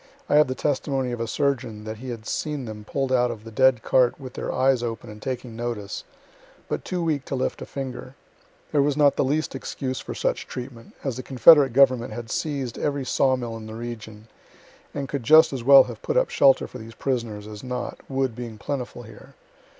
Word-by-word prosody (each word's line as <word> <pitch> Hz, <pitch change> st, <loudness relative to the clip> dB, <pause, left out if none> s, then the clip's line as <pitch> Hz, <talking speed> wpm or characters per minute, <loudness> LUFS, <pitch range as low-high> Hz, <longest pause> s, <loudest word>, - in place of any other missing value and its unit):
I -, -, 0 dB
have 150 Hz, -1 st, +6 dB
the 130 Hz, -, -3 dB
testimony 135 Hz, -2 st, -1 dB
of 120 Hz, -1 st, -4 dB
a 115 Hz, -, -2 dB
surgeon 125 Hz, -5 st, -1 dB
that 110 Hz, 0 st, -6 dB
he 130 Hz, +3 st, -8 dB
had 115 Hz, -2 st, -6 dB
seen 150 Hz, -2 st, -3 dB
them 110 Hz, -2 st, -8 dB
pull'd 135 Hz, +3 st, -2 dB
out 125 Hz, -1 st, +3 dB
of 115 Hz, -2 st, -6 dB
the 115 Hz, -, -10 dB
dead 130 Hz, 0 st, +3 dB
cart 125 Hz, 0 st, +3 dB
with 130 Hz, -2 st, -9 dB
their -, -, -4 dB
eyes 130 Hz, -1 st, +2 dB
open 115 Hz, -1 st, -5 dB
and 105 Hz, 0 st, -12 dB
taking 125 Hz, -2 st, -5 dB
notice, 115 Hz, -4 st, -4 dB, 0.6 s
but -, -, -3 dB
too 180 Hz, -2 st, -2 dB
weak 155 Hz, -5 st, 0 dB
to 135 Hz, -, -3 dB
lift 130 Hz, -, -2 dB
a -, -, -6 dB
finger. 130 Hz, -1 st, -6 dB, 0.6 s
There 145 Hz, -, +3 dB
was 140 Hz, 0 st, +1 dB
not 145 Hz, -2 st, +5 dB
the -, -, +2 dB
least 150 Hz, +4 st, 0 dB
excuse 130 Hz, -1 st, -4 dB
for -, -, -7 dB
such -, -, -1 dB
treatment, 125 Hz, -2 st, -8 dB
as 130 Hz, -4 st, -2 dB
the -, -, -4 dB
confederate 135 Hz, +2 st, +6 dB
government 130 Hz, -2 st, +4 dB
had 120 Hz, -2 st, -7 dB
seized 140 Hz, -6 st, -3 dB
every 140 Hz, -2 st, -1 dB
sawmill 125 Hz, -4 st, +1 dB
in 110 Hz, -1 st, -9 dB
the 110 Hz, -, -8 dB
region, 110 Hz, -2 st, -8 dB, 0.6 s
and 140 Hz, -1 st, -4 dB
could 140 Hz, 0 st, -3 dB
just 155 Hz, +5 st, +6 dB
as 130 Hz, -3 st, -4 dB
well 135 Hz, +2 st, +9 dB
have -, -, -9 dB
put 470 Hz, -, -1 dB
up -, -, +2 dB
shelter 135 Hz, -1 st, +5 dB
for 125 Hz, -, -10 dB
these 115 Hz, +1 st, -11 dB
prisoners 115 Hz, -6 st, -3 dB
as 105 Hz, +1 st, -9 dB
not, 125 Hz, -1 st, -4 dB
wood 135 Hz, -3 st, -1 dB
being 120 Hz, -2 st, -7 dB
plentiful 125 Hz, 0 st, -5 dB
here. 110 Hz, -2 st, -14 dB
130 Hz, 210 wpm, -24 LUFS, 115-135 Hz, 0.6 s, well